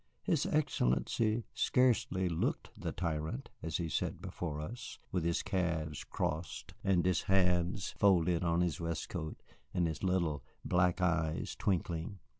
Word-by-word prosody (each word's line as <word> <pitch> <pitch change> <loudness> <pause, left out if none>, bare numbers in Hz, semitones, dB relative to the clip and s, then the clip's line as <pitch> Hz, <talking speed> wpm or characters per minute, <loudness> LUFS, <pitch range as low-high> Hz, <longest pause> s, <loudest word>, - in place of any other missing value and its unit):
His 165 -8 +2
Excellency 110 - +1
scarcely 120 -7 +3
looked 85 -2 -1
the - - -3
tyrant 85 - -3
as 80 0 -2
he 85 - -2
sat 75 - -1
before 75 -4 -4
us, 110 +11 -6
with 90 -3 0
his 85 0 +1
calves 85 -6 -1
crossed 80 +1 -3
and 95 -3 +3
his 90 -3 +3
hands 90 0 +2
folded 90 -3 +4
on 85 0 +2
his 90 -1 0
waistcoat 85 -1 -4 0.3
and 90 - +3
his 80 -2 -2
little 85 -7 +1 0.2
black 90 0 +3
eyes 80 -3 +1
twinkling. 90 -3 -1
90 Hz, 135 wpm, -34 LUFS, 80-95 Hz, 0.3 s, folded